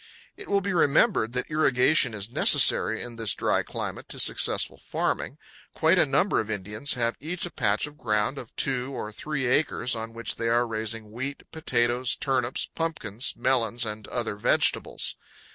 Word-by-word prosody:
It 405 - -11
will 200 0 +2
be 200 0 -2
remembered 145 - +3
that 125 - -1
irrigation 135 -4 +3
is 105 +2 -4
necessary 110 -2 +4
in 120 -1 -9
this 110 -3 -1
dry - - +1
climate - - -6
to - - -6
successful - - +3
farming. 140 - -2 0.4
Quite 165 +3 +3
a - - +4
number 145 +9 +2
of 110 0 -3
Indians 105 +5 -1
have 115 -1 0
each 165 +5 -4
a 175 - -7
patch 105 0 0
of 150 +1 -12
ground 105 +4 0
of 115 - -11
two 130 0 0
or 105 - -5
three 135 +4 -3
acres, 125 -2 +1
on 115 0 -6
which 115 0 -3
they 115 - -1
are 120 +1 +3
raising 110 -1 -3
wheat, 130 +5 -5
potatoes, 120 -5 0
turnips, 130 -2 -1
pumpkins, 130 -9 -2
melons, 120 -2 +1
and 105 -1 -6
other 115 -4 -2
vegetables. 105 - +1
120 Hz, 170 wpm, -26 LUFS, 110-145 Hz, 0.4 s, necessary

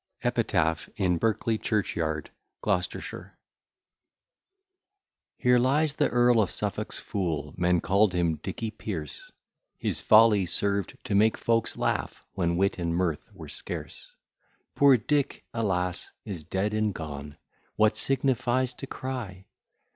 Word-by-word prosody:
EPITAPH 80 0 +1
IN 90 -3 +1
BERKELEY 110 +1 0
CHURCH 105 -3 -1
YARD, 80 -3 -2 0.3
GLOUCESTERSHIRE 95 -3 -3 2.0
Here 125 -1 +4
lies 140 +4 +3
the - - +1
Earl 120 -1 +4
of 100 - 0
Suffolk's - - -3
fool, 80 -7 -3
Men 90 -1 +2
call'd 100 0 +3
him 85 -3 +1
Dicky 110 +6 -5
Pearce; 90 -9 -5 0.5
His - - -1
folly 110 -3 +6
served 100 +1 +1
to 125 - -3
make 110 +2 +4
folks 115 -1 0
laugh, - - -2
When 85 0 0
wit 95 0 +1
and 85 -1 -1
mirth 85 -4 -1
were 85 -6 -10
scarce. - - -7 0.6
Poor 140 -2 +6
Dick, 140 +5 -1
alas! 90 -6 -1 0.2
is 90 -6 -6
dead 95 +6 -1
and 110 -2 0
gone, 75 -2 -7 0.4
What 110 0 +3
signifies 130 -1 +1
to 135 - -8
cry? 115 -10 -6
100 Hz, 125 wpm, -27 LUFS, 85-115 Hz, 2.0 s, folly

